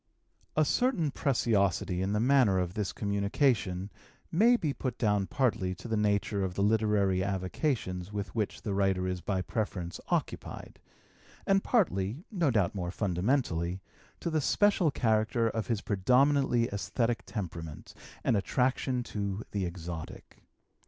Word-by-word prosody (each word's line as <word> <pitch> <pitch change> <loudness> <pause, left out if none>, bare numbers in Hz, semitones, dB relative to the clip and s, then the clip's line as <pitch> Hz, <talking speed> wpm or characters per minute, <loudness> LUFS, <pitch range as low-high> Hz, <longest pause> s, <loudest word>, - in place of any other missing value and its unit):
A 155 - +4
certain 195 - +1
preciosity 100 - +1
in 95 +1 0
the 105 - +1
manner 125 -5 +4
of 90 -1 -1
this 105 -2 -2
communication 100 -2 0 0.4
may 230 +8 +5
be 150 -10 -1
put 130 -4 -4
down 105 -4 +1
partly 100 -9 0
to 105 - -9
the 110 - 0
nature 105 -1 +1
of 90 -1 -3
the 100 - +1
literary 105 -3 +2
avocations 95 - -2
with 105 -1 -4
which 110 -3 -2
the 105 - -2
writer 95 -2 +1
is 90 -1 -3
by 95 -1 -1
preference 90 -6 -3
occupied, - - -3 0.7
and 195 0 +3
partly, 130 - +1
no 175 -8 +1
doubt 105 -8 +2
more 90 -3 -3
fundamentally, 90 -2 0 0.4
to 170 - -2
the 155 -1 +1
special 200 +1 +3
character 110 -2 +1
of 110 -1 -2
his 115 -4 -1
predominantly 125 +4 +3
esthetic 115 +3 -1
temperament 85 -7 -6 0.3
and - - +2
attraction 125 +4 0
to 100 -2 -3
the 100 -2 -1
exotic. 85 -2 -8
105 Hz, 140 wpm, -30 LUFS, 95-125 Hz, 0.7 s, may